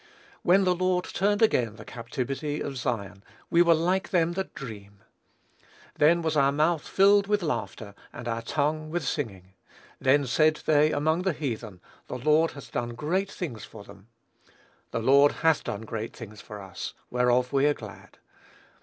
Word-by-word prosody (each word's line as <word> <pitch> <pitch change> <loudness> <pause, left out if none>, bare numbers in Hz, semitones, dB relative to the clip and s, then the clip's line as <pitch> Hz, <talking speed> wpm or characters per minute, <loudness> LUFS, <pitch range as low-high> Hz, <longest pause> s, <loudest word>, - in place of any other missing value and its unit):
"When 190 +3 +4
the 180 -1 +3
Lord 180 0 0
turned 205 +3 +1
again 120 - +2
the 110 -1 -12
captivity 130 +5 -4
of 140 - -4
Zion, 100 -7 -4 0.3
we 170 - +5
were 170 -1 +5
like 180 +4 0
them 170 -2 +2
that 190 +2 -5
dream. 100 -6 -10 0.9
Then 165 +3 +3
was 160 -1 0
our 140 -1 +4
mouth 155 +2 +1
filled 200 +1 +4
with 205 -2 +1
laughter, 115 -8 -4 0.2
and 120 0 -8
our 115 0 -2
tongue 155 +5 -1
with 170 0 -2
singing: 95 - -4 0.5
then 140 +2 +3
said 155 +5 +2
they 155 0 +4
among 155 +4 +1
the 190 -1 0
heathen, 115 - -5 0.3
the - - -5
Lord 155 +5 +2
hath 140 - -11
done 120 -1 -3
great 185 +10 -1
things 135 -12 -6
for 105 - -11
them; 100 0 -15 0.8
the - - -3
Lord 140 +5 +5
hath 160 -2 +3
done 105 - -4
great 110 0 -5
things 110 -3 -10
for 105 -1 -9
us, 95 -2 -7 0.2
whereof 125 +1 +2
we 140 +1 +4
are 145 - +2
glad." 105 -5 -12
145 Hz, 170 wpm, -27 LUFS, 115-165 Hz, 0.9 s, we